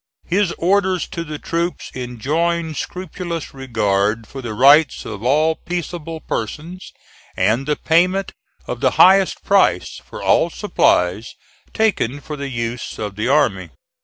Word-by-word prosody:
His 190 0 +1
orders 190 0 +1
to 170 - -4
the 155 -2 -6
troops 170 +3 -3
enjoined 155 +7 -2
scrupulous 175 -2 -5
regard 110 -4 0
for 135 +4 -9
the 115 -4 -5
rights 140 +4 +5
of 110 -3 -7
all 150 +6 +3
peaceable 165 -2 -5
persons 160 - -5 0.5
and 110 +9 +1
the 150 - +1
payment 180 +6 +1 0.3
of - - -5
the - - +2
highest 190 +1 +5
price 195 - +2
for - - -9
all - - +3
supplies 90 +6 +1 0.4
taken 175 - 0
for 150 +2 -7
the 140 -1 -5
use 115 -1 -4
of 105 -2 -5
the 105 +3 -2
army. 145 +2 +2
150 Hz, 135 wpm, -19 LUFS, 115-175 Hz, 0.5 s, rights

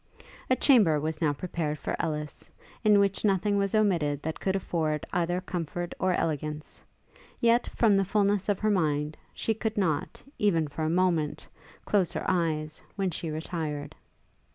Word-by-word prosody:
A 255 - +5
chamber 210 - +5
was 155 +1 -3
now 155 -3 +3
prepared 155 -1 -3
for - - -3
Ellis, 150 -2 -4 0.3
in 210 -2 +6
which 200 -1 +1
nothing 200 0 +2
was 200 +1 0
omitted 165 -9 +1
that 160 0 -3
could 190 0 0
afford 160 -5 -1
either 175 0 +1
comfort 175 -2 -4
or 185 0 +2
elegance; 150 -1 -3 0.6
yet, 235 +1 +3
from 220 -4 +4
the 195 - +3
fulness 200 0 +1
of 205 - +2
her 215 0 +2
mind, 150 -5 0 0.2
she 225 - -1
could 220 0 -3
not, 160 -7 -1 0.2
even 165 -7 +2
for 145 +2 -7
a 155 - +1
moment, 170 -3 +1 0.4
close 195 -4 +2
her - - -3
eyes, 155 -3 0
when 195 -3 0
she 165 0 -4
retired. 155 -2 -4
175 Hz, 160 wpm, -28 LUFS, 155-200 Hz, 0.6 s, in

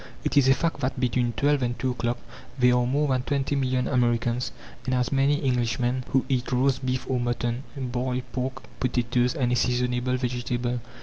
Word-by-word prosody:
It - - -1
is 140 -2 +5
a 135 - +6
fact 165 -2 -1
that 130 -1 -2
between 120 -1 +1
twelve 140 +5 +2
and 120 -1 -1
two 130 - 0
o'clock 120 -1 -1 0.4
there 125 -1 +5
are 125 0 +2
more 145 +4 +1
than 130 -1 +2
twenty 140 +1 -1
million 130 -2 +1
Americans 120 -1 +1 0.3
and 130 -1 +1
as 125 -1 0
many 140 +2 +2
Englishmen 125 0 0
who 130 - +2
eat 125 -1 -1
roast 130 +1 +2
beef 130 0 -1
or 130 -1 0
mutton, 120 0 -1 0.2
boiled 125 -1 -2
pork, 130 +1 -3 0.2
potatoes 125 +1 +1
and 125 -5 +1
a - - +3
seasonable 125 +1 +1
vegetable. 125 -1 -2
125 Hz, 185 wpm, -26 LUFS, 120-130 Hz, 0.4 s, a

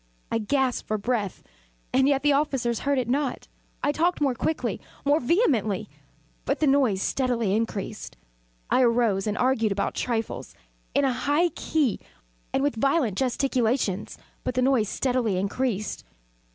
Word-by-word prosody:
I 230 - +1
gasped 255 +3 0
for 215 - 0
breath 210 -2 -2 0.5
and 265 +1 +4
yet 275 -1 +2
the 295 -1 +4
officers 270 -5 0
heard 280 -1 0
it 250 -3 0
not. 270 +1 -1 0.4
I 290 - +3
talked 340 +4 +1
more 280 -3 +2
quickly 310 +6 -2 0.2
more 290 +2 +4
vehemently; 240 - +1 0.5
but - - -1
the 310 - +3
noise 265 -9 +3
steadily 240 -6 0
increased. 220 -3 -3 0.5
I - - +4
arose 230 -5 +2
and 210 - -1
argued 245 -4 +2
about 200 0 -1
trifles, 230 -2 -3 0.4
in 280 0 +4
a 265 - +2
high 295 +7 +2
key 295 -6 0 0.5
and 270 - +1
with 285 -5 0
violent 275 - +2
gesticulations; 245 -5 0 0.3
but 250 - -2
the 255 - +2
noise 250 -6 +2
steadily 245 -7 0
increased. 210 +2 -2
255 Hz, 150 wpm, -26 LUFS, 220-280 Hz, 0.5 s, and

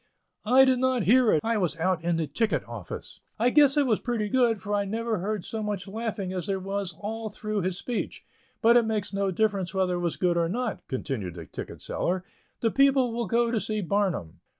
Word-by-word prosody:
"I 260 +3 +7
did 260 -1 +3
not 260 -3 +2
hear 245 +3 +5
it. 155 - +3
I 230 -1 +1
was 180 -3 0
out 170 0 0
in 170 0 +1
the 165 - 0
ticket 215 +10 -1
office. - - -8 0.2
I 240 +3 +3
guess 290 0 +5
it 290 - +4
was 225 -5 +2
pretty 230 -4 -2
good, 235 -2 +3
for 205 +2 -4
I 205 0 +2
never 220 +1 -2
heard 205 0 -3
so 220 - -4
much 205 -2 -3
laughing 210 -2 -3
as 185 0 -3
there 195 -1 0
was 195 -2 -2
all 220 +1 -4
through 215 0 -3
his 185 0 -2
speech. 240 +2 -4 0.4
But 235 +2 +7
it 235 - +4
makes 215 -3 -2
no 195 0 0
difference 195 -1 0
whether 185 -1 +1
it - - -3
was 175 -2 -2
good 175 -2 +1
or 165 -1 +1
not," 240 +3 -2
continued 125 - -4
the 85 -2 -8
ticket - - -8
seller, 185 +1 -1 0.4
"the 225 - +2
people 270 -3 +3
will 235 -1 -2
go 235 +3 +2
to 230 - +1
see 215 0 -2
Barnum." 180 - -1
210 Hz, 220 wpm, -27 LUFS, 185-230 Hz, 0.4 s, I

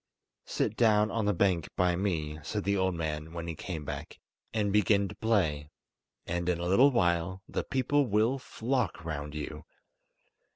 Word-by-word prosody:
"Sit 110 - -1
down 110 -2 +4
on 115 -2 -1
the 105 - +3
bank 90 -4 +1
by 90 -1 +2
me," 80 -5 -2
said 105 +7 -3
the 100 0 +1
old 95 -2 +1
man, 80 -1 -4
when 85 -1 -5
he 85 - -3
came 80 -2 -6
back, - - -6 0.3
"and 105 -3 0
begin 100 -1 +3
to - - -8
play, 80 -10 0 0.6
and 85 +1 -2
in 90 - +1
a 85 - -2
little 100 +10 +6
while 90 -4 +1
the - - -2
people 135 +2 +1
will 110 +5 +2
flock 125 - -2
round 75 -2 -4
you." 75 - -5
95 Hz, 170 wpm, -30 LUFS, 85-110 Hz, 0.6 s, little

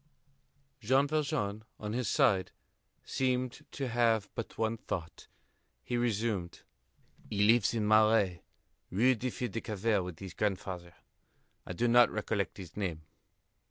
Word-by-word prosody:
Jean 130 +5 +3
Valjean, 110 -9 -1 0.2
on 105 0 -4
his 120 -4 -1
side, 95 -2 +3 0.6
seemed 130 +1 -1
to 135 -2 -3
have 115 -3 +2
but 115 - -6
one 110 0 0
thought. 85 -6 -6 0.6
He 120 - -3
resumed: 110 -6 -1 0.7
"He 105 0 +1
lives 115 +1 +4
in 110 - 0
the - - 0
Marais, 110 -5 +4 0.5
Rue 120 +8 +4
des 125 +2 -3
Filles 125 0 -3
du 115 +3 -3
Calvaire, 105 -1 0
with 90 -2 -6
his 95 -1 -8
grandfather. 90 -4 -3 0.7
I - - -4
do 120 +7 +1
not 120 0 +6
recollect 105 -2 -2
his 90 -4 -10
name." 90 -6 -3
110 Hz, 140 wpm, -31 LUFS, 95-120 Hz, 0.7 s, not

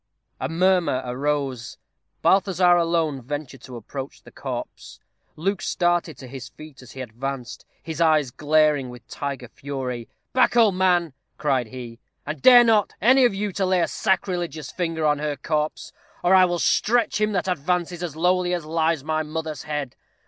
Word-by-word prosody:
A - - -3
murmur 170 -6 +2
arose. 135 -1 -2 0.5
Balthazar 185 -2 +4
alone 165 -5 +1
ventured 140 0 -6
to 125 - -10
approach 135 +4 -8
the - - -15
corpse. - - -7 0.4
Luke 195 +5 -2
started 175 -4 0
to 130 - -10
his 130 0 -8
feet 155 -4 -13
as 125 - -13
he 130 - -7
advanced, 125 +1 -6 0.2
his 160 0 -5
eyes 155 -5 +3
glaring 150 -2 +2
with 125 0 -12
tiger 140 -3 -5
fury. 125 -2 -6 0.2
"Back, 255 -1 +3
old 220 -4 +5
man," 180 -4 +2 0.2
cried 135 -5 0
he, 120 -1 -9 0.3
"and 150 -1 -5
dare 245 -1 +9
not, 220 -3 +3
any 255 +5 +5
of 235 - +2
you, 205 +1 -2
to 195 - -2
lay 185 -1 +2
a - - +2
sacrilegious 175 -7 -2
finger 165 -3 -2
on 150 -1 +2
her 150 -1 -2
corse, 150 +1 -2 0.3
or 175 +2 +4
I 185 -1 +7
will 175 -1 -1
stretch 230 +5 +2
him 215 0 +1
that 185 -1 -1
advances 175 +1 -1
as 170 -4 -4
lowly 180 +2 +1
as 170 -3 -5
lies 160 -2 0
my 155 +1 -1
mother's 155 -2 -5
head. 150 -4 -4
155 Hz, 170 wpm, -23 LUFS, 135-180 Hz, 0.5 s, dare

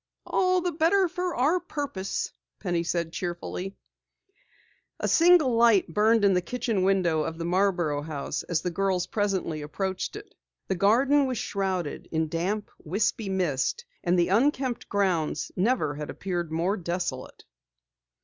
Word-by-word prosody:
"All 370 0 +2
the 355 0 -1
better 340 +5 +3
for 360 +1 -3
our 300 +9 +2
purpose," 285 - -4 0.3
Penny 175 -4 -1
said 170 -1 -2
cheerfully. 180 +2 -4 1.2
A - - -1
single 335 -6 +5
light 230 -7 +4
burned 215 +2 +4
in 195 - +5
the 180 - +2
kitchen 225 0 -2
window 185 -4 +2
of 160 +1 -3
the 165 - -4
Marborough 175 -5 +1
house 145 -2 -4
as 165 -2 -2
the 180 - -1
girls 185 0 0
presently 190 -6 -1
approached 190 +5 -3
it. 420 +1 -10 0.4
The - - +2
garden 265 +9 +4
was 255 -2 -2
shrouded 190 -7 -3
in 160 -1 0
damp, 190 +6 -2
wispy 205 +4 -1
mist 185 - -1 0.2
and 175 +1 +2
the 175 0 +2
unkempt 255 +3 +1
grounds 180 -7 0
never 185 - +1
had 150 0 -6
appeared 175 -4 -3
more 175 +6 0
desolate. 170 -6 -4
190 Hz, 145 wpm, -27 LUFS, 170-235 Hz, 1.2 s, single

